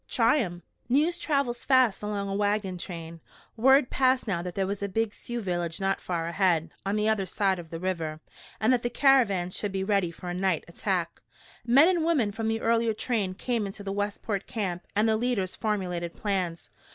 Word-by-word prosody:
"Try 230 +4 +4
him!" 175 - -3 0.3
News 310 +7 +2
travels 275 -5 0
fast 260 -6 +3
along 205 -1 -3
a 195 - -3
wagon 205 -2 0
train. 170 -2 -7 0.4
Word 265 +3 +4
passed 255 -2 +2
now 180 -5 0
that 180 0 -6
there 195 - +1
was 200 +1 -3
a 200 - -2
big 220 +2 -1
Sioux 240 0 -5
village 175 -4 -2
not 195 0 0
far 170 -2 -2
ahead, 170 -2 +1
on 195 +1 -1
the 210 0 +1
other 210 -3 +1
side 190 0 0
of 165 -2 -10
the 165 - -6
river, 165 -4 -3 0.4
and 220 +5 +3
that 245 - +2
the 240 - -1
caravan 230 -10 +3
should 205 +2 -3
be 190 0 -2
ready 195 -3 +1
for 170 +2 -10
a 175 - -2
night 185 -3 0
attack. 170 -1 -2 0.5
Men 275 +7 +7
and 355 -3 +2
women 290 -11 +2
from 220 +2 -3
the 225 0 -1
earlier 230 -1 +2
train 205 -6 -1
came 230 0 -1
into 200 +1 -8
the 195 - -4
Westport 205 0 -3
camp 190 -7 -3
and 210 +2 +3
the 220 - +3
leaders 220 -6 -1
formulated 180 -6 -2
plans. 180 - -2
200 Hz, 200 wpm, -27 LUFS, 180-230 Hz, 0.5 s, Men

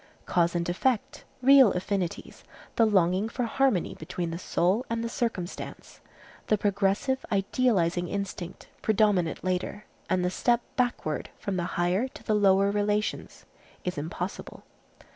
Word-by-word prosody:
Cause 170 0 +1
and 170 0 0
effect, 255 +9 -1 0.2
real 265 -5 +7
affinities, 185 -1 -3 0.3
the 230 - +4
longing 190 +1 +2
for 245 - -3
harmony 235 -6 +1
between 170 +1 -4
the 165 - -5
soul 185 +5 +1
and 230 0 -1
the - - -1
circumstance, 220 -7 -4 0.5
the 215 - +3
progressive, 200 +6 0
idealizing 195 -4 +1
instinct, 190 -2 -5
predominate 205 -6 +2
later, 185 +3 -2 0.2
and 185 -1 +1
the 180 - 0
step 240 +5 +2
backward 245 - -1
from 200 - -3
the 175 -1 -1
higher 180 +8 +1
to - - -13
the 215 - 0
lower 200 -1 +4
relations 205 +1 -1 0.4
is 180 - -2
impossible. 170 +5 -5
195 Hz, 135 wpm, -27 LUFS, 180-225 Hz, 0.5 s, real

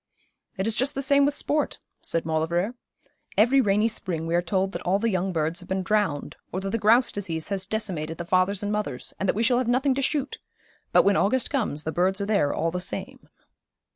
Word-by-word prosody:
'It 190 - -1
is 225 - +1
just 260 +5 0
the 275 - -1
same 280 +1 +4
with 285 - -1
sport,' 295 +1 0 0.2
said 165 - -1
Maulevrier. 165 +6 0 0.6
'Every 245 +6 +5
rainy 210 0 +2
spring 180 -7 -3
we 165 - -2
are 175 - +3
told 190 +2 0
that 170 - -5
all 185 +2 +1
the 225 +2 0
young 185 0 0
birds 165 0 -1
have 180 - -14
been 190 0 -1
drowned, 200 -8 0 0.2
or 185 - -2
that 195 0 -4
the 230 - -1
grouse 230 +4 +4
disease 170 -5 -4
has 195 -2 -2
decimated 175 -8 -3
the 170 - -5
fathers 185 +3 +1
and 205 - -1
mothers, 210 -12 -2
and 195 - 0
that - - +2
we 225 - +1
shall 245 +2 +3
have 255 - -1
nothing 260 +3 +2
to 275 - -1
shoot; 280 0 -1 0.5
but - - +6
when 200 0 +3
August 250 +5 +1
comes 215 - -1
the 160 - -2
birds 185 +4 +1
are 200 - -1
there 200 -9 +2
all 165 - -1
the 180 +1 -3
same.' 180 - -6
195 Hz, 230 wpm, -25 LUFS, 175-230 Hz, 0.6 s, but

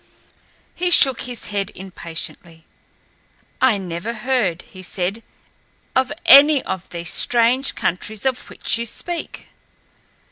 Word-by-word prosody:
He 360 0 -2
shook 265 -7 +6
his 245 -3 -5
head 200 -2 -3
impatiently. 170 -2 -8 1.0
"I 260 -5 +4
never 185 +4 -5
heard," 215 -7 -1
he 185 - -14
said, 185 +3 -3 0.7
"of 260 +1 +1
any 285 0 +7
of 185 -1 -6
these 170 0 -3
strange 245 +3 +3
countries 205 +5 -3
of 260 -1 -2
which - - 0
you 235 - -2
speak." 345 +8 -5
220 Hz, 115 wpm, -20 LUFS, 180-260 Hz, 1.0 s, any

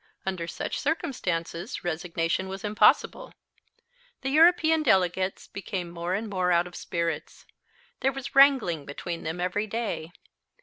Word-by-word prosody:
Under 185 -3 -3
such 165 - -4
circumstances 200 - -3
resignation 170 +1 -1
was 190 +1 -7
impossible. 210 +1 +2 0.9
The 270 0 -2
European 320 0 +5
delegates 190 - +1
became 190 -3 -5
more 170 +2 -2
and 220 +3 -3
more 185 -3 0
out 170 0 +3
of 175 0 -10
spirits. 170 -3 -4 0.5
There 270 - +2
was 270 0 -7
wrangling 265 - +5
between 170 +4 -5
them 160 +3 -4
every 185 +4 -1
day. 215 -7 -3
185 Hz, 130 wpm, -27 LUFS, 170-235 Hz, 0.9 s, European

